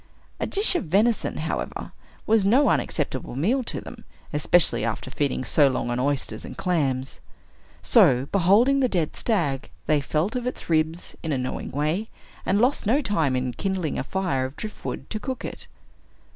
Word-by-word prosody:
A - - -1
dish 405 +1 +3
of 355 - -1
venison, 210 +8 +1
however, - - -4 0.3
was 220 -1 +3
no 255 +9 +4
unacceptable 130 -5 -1
meal 225 - +1
to - - -4
them, - - -11 0.3
especially 150 -3 +3
after 115 +3 -3
feeding 140 -1 -1
so 145 +2 +4
long 125 -2 -1
on 120 - -1
oysters 140 +1 -1
and - - -9
clams. 135 -7 -1 0.6
So, 140 - +5
beholding 205 +9 +4
the 255 -2 +2
dead 170 -7 -1
stag, 155 - -1 0.2
they 150 -1 +2
felt 155 - -1
of 250 0 -2
its 250 - -5
ribs, 160 +2 0
in 160 - -3
a 140 - +1
knowing 125 0 -4
way, 155 - -1 0.4
and 190 - +3
lost 250 -2 +2
no 255 +7 +4
time 160 - +1
in 125 -1 -1
kindling 190 -4 -2
a - - -1
fire 165 -5 -1
of 130 +2 -7
driftwood, 215 -1 -6
to 215 - -2
cook 260 +3 -5
it. - - -8
165 Hz, 170 wpm, -25 LUFS, 135-215 Hz, 0.6 s, So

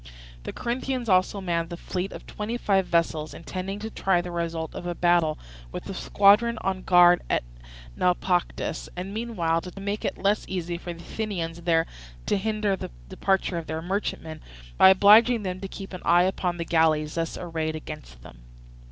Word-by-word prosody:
The - - -4
Corinthians 250 +1 -3
also 185 +2 +2
manned 170 -2 -1
a 170 - -5
fleet 185 +2 -4
of - - -9
twenty 215 +3 -4
five 195 -5 +1
vessels, 160 -2 0
intending 185 +3 -5
to 220 +1 -5
try 190 -4 +1
the 175 0 -5
result 165 -2 -3
of 175 - -6
a 175 - -2
battle 175 -3 +2 0.3
with - - -6
the - - -6
squadron 210 +4 +4
on 190 -1 -1
guard 175 -1 +6
at - - +1 0.5
Naupactus, 180 0 0
and 185 +2 -5
meanwhile 180 -8 -1
to 180 +2 -9
make 200 +2 -3
it - - -2
less 200 +2 +1
easy 175 -2 -3
for 175 - -6
the 170 - -9
Athenians 170 -7 -4
there 165 -1 +2 0.4
to - - +1
hinder 210 0 0
the - - -7 0.2
departure 190 -3 0
of 165 - -9
their 160 +1 -4
merchantmen, 170 -4 -3 0.3
by 190 - +8
obliging 215 +4 +6
them 185 -1 -3
to 195 - -5
keep 195 0 -9
an 185 - -6
eye 175 +1 +5
upon 180 -1 -1
the 170 - -3
galleys 155 -2 +2
thus 165 -1 -2
arrayed 160 -2 -3
against - - -9
them. - - -13
180 Hz, 180 wpm, -26 LUFS, 165-200 Hz, 0.5 s, by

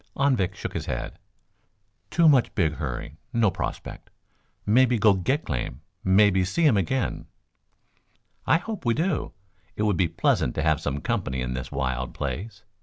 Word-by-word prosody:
Anvik 120 -9 +1
shook - - -6
his - - -4
head. - - -4 0.9
"Too 170 -1 +4
much 135 -5 +4
big 80 -5 +1
hurry. 75 +1 -5
No 115 -4 +3
prospect. - - -6 0.6
Mebby 125 +3 +4
go 105 -1 +5
get 130 - -1
claim. 60 -1 -4 0.2
Mebby 95 0 +4
see 155 - +2
um 130 - +4
again." 105 +6 -1 1.2
"I 155 - +5
hope 210 +2 -6
we 120 -2 +2
do. 165 +1 -1 0.4
It 105 - -1
would 105 -4 +2
be 90 - +3
pleasant 60 - +1
to - - -1
have - - +2
some 70 0 -3
company 65 -1 -2
in 65 0 -2
this 65 0 -5
wild 65 -2 -2
place. 95 - -5
95 Hz, 160 wpm, -25 LUFS, -, 1.2 s, go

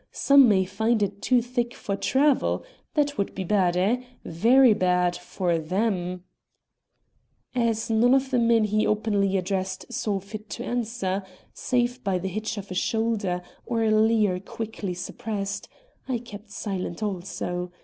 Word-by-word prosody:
Some 275 -3 +6
may 190 -2 +3
find 220 +3 +1
it 200 0 -3
too 250 -2 +3
thick 240 -1 -2
for 200 - -3
travel. 275 +6 +2 0.3
That 290 -3 +1
would 200 - -1
be 190 - -3
bad, 180 -2 +2
eh? 215 +7 +2 0.2
very 235 +8 +5
bad 180 -2 +2
for 175 -1 -1
them." 180 +1 -1 1.3
As 230 -3 0
none 240 +4 +5
of 270 0 0
the 250 - +3
men 230 -1 +4
he 215 0 +1
openly 205 -2 +1
addressed 190 0 -3
saw 205 -3 -1
fit 210 +2 -9
to 240 - -5
answer, 225 -5 -2 0.3
save 245 0 -1
by 195 -2 +1
the 190 +2 -3
hitch 215 +3 -3
of 200 -1 -7
a - - -2
shoulder 205 -3 0 0.2
or 230 -2 -1
a 220 - +2
leer 215 -3 +3
quickly 205 -2 -5
suppressed, 200 +2 -4 0.4
I 255 -2 0
kept 215 -3 -11
silent 195 -2 -4
also. 180 -2 -3
210 Hz, 150 wpm, -25 LUFS, 185-230 Hz, 1.3 s, Some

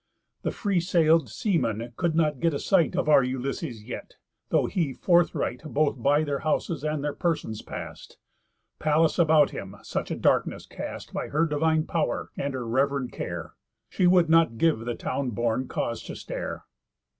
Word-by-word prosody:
The - - -1
free 200 -5 0
sail'd 165 - +3
seamen 115 - -1
could 165 +2 0
not 150 -4 +2
get 165 0 +1
a - - -2
sight 180 -2 +2
Of 180 - 0
our 150 -2 +7
Ulysses 130 -1 -3
yet, 120 - -8 0.3
though - - +3
he 160 -8 -1
forthright 170 -8 +1
Both 150 -4 0
by 145 +5 +3
their 145 -2 -2
houses 155 0 -1
and 150 -2 -1
their 145 -1 -1
persons 160 - -2
past, - - -8 0.6
Pallas 155 +2 +2
about 155 -3 +5
him 95 +1 -7
such - - -3
a - - -2
darkness - - +1
cast - - -7
By - - -3
her 155 +3 +1
divine 160 +1 +1
pow'r, 165 - -1
and 140 -1 -3
her 125 -2 -4
rev'rend 135 +1 0
care, - - -5 0.4
She 180 - +2
would 175 -2 +5
not 165 -7 +4
give 160 -2 +3
the 120 +1 -4
town 135 +2 -2
born 120 +3 -1
cause 115 -1 -3
to - - -7
stare. - - -6
150 Hz, 170 wpm, -26 LUFS, 125-165 Hz, 0.6 s, our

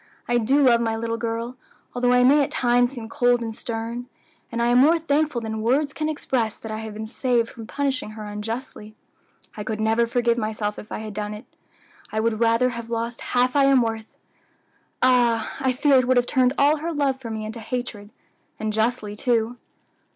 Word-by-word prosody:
"I 240 0 +2
do 270 +6 +3
love 235 -3 +5
my 225 -1 0
little 230 0 -2
girl, 230 +2 -3 0.4
although 245 0 +1
I 250 0 +5
may 285 +4 +6
at - - -2
times 245 +1 +2
seem 235 -4 -7
cold 245 -1 +2
and 225 -1 -4
stern; 230 +2 -5 0.4
and 235 - -3
I 235 0 +2
am 245 +1 +5
more 315 +6 +6
thankful 300 -4 0
than 220 -1 -4
words 275 +6 +1
can 310 0 -2
express 245 -7 -1
that 220 - -8
I 215 - -4
have 220 -1 -7
been 220 +1 -5
saved 240 0 0
from 225 -2 -10
punishing 270 -4 -2
her 215 - -6
unjustly. 215 +1 -6 0.6
I 210 - -5
could 215 0 -4
never 225 +2 +2
forgive 240 0 +1
myself 215 -1 -3
if 210 - -12
I - - -3
had 215 -1 -7
done 210 0 -4
it. 210 - -11 0.7
I 220 - -1
would 220 0 0
rather 230 +2 +3
have 235 -1 -7
lost 230 0 -3
half 250 +1 +1
I 280 -1 +5
am 270 -3 +5
worth; 225 -1 -5 0.9
ah! 240 -3 +3
I 265 -1 +1
fear 270 +2 +3
it 255 -1 +2
would 255 0 +3
have 245 - +3
turned 255 0 +2
all 290 +2 +4
her 325 +3 -3
love 275 -4 0
for 235 - -6
me 220 -1 -4
into 220 +2 -6
hatred; 225 -3 -5 0.5
and 215 0 -2
justly, 220 -1 -1
too." 235 +1 0
235 Hz, 205 wpm, -23 LUFS, 220-255 Hz, 0.9 s, may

